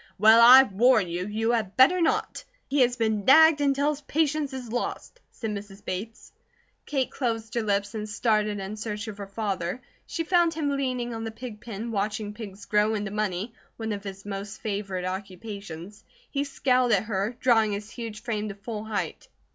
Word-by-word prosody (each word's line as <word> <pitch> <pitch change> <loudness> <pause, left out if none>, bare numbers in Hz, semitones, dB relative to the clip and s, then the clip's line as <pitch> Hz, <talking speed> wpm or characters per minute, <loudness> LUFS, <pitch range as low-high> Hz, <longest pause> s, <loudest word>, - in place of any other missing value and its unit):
"Well, 220 +3 +7
I 255 +3 +10
warn 220 -2 +3
you, 175 +2 -3
you 220 +2 0
had 220 -5 -1
better 345 +8 +6
not! 325 - 0 0.2
He 280 0 +1
has 245 -1 +3
been 220 -3 0
nagged 315 +4 +7
until 285 +1 +2
his 295 -1 -6
patience 295 0 0
is 255 -4 -7
lost," 245 - -4
said 225 -2 -5
Mrs. 200 -1 -8
Bates. 210 +5 -6 0.6
Kate 270 -3 -1
closed 225 -4 -3
her 235 - 0
lips 205 -1 0
and 215 -1 -5
started 210 -1 +1
in 195 +2 -5
search 210 0 -4
of 210 -1 -7
her 200 - -6
father. 195 -1 -3 0.3
She 330 - -2
found 345 -1 +3
him 295 -3 -1
leaning 250 -3 -2
on 225 0 -5
the 225 - -3
pig 220 -1 -9
pen 230 +1 -5
watching 210 0 -2
pigs 205 -2 -9
grow 210 +1 +2
into 205 -1 -3
money, 210 +1 -2 0.2
one 225 -1 -3
of 200 -1 -4
his 195 -1 -8
most 200 0 -6
favoured 195 -3 -3
occupations. 195 0 -7 0.3
He 280 0 -1
scowled 255 -3 +2
at 195 -1 +3
her, 210 +2 -2
drawing 225 -4 +3
his 210 +2 -6
huge 225 -3 -7
frame 215 -3 -2
to 200 - -6
full 210 +1 -6
height. 215 -1 -4
220 Hz, 185 wpm, -26 LUFS, 205-250 Hz, 0.6 s, I